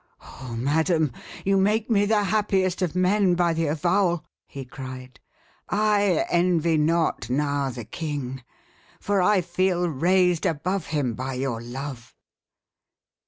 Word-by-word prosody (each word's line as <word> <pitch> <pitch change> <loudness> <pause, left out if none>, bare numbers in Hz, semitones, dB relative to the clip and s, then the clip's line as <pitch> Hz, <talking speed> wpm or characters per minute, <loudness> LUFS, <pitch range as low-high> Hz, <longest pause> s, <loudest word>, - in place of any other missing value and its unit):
"Oh, 125 -3 -9
madam! 155 +4 +1 0.3
you 195 0 +3
make 210 +3 +2
me 205 -3 +2
the 210 -1 +2
happiest 195 -2 0
of 180 -2 -1
men 185 0 +3
by 175 -1 +2
the 165 0 0
avowal," 175 +3 +1 0.2
he 135 -1 -8
cried. 130 -1 -9 0.5
"I 205 -4 +2
envy 170 -2 +2
not 160 0 +1
now 140 +1 0
the 120 -3 -7
king, 140 - -5 0.6
for 200 -1 +1
I 195 +1 +3
feel 180 0 0
raised 175 +3 +2
above 180 +4 -2
him 145 -6 -1
by 130 +2 -4
your 125 -3 -2
love." 125 0 -7
165 Hz, 130 wpm, -24 LUFS, 135-185 Hz, 0.6 s, you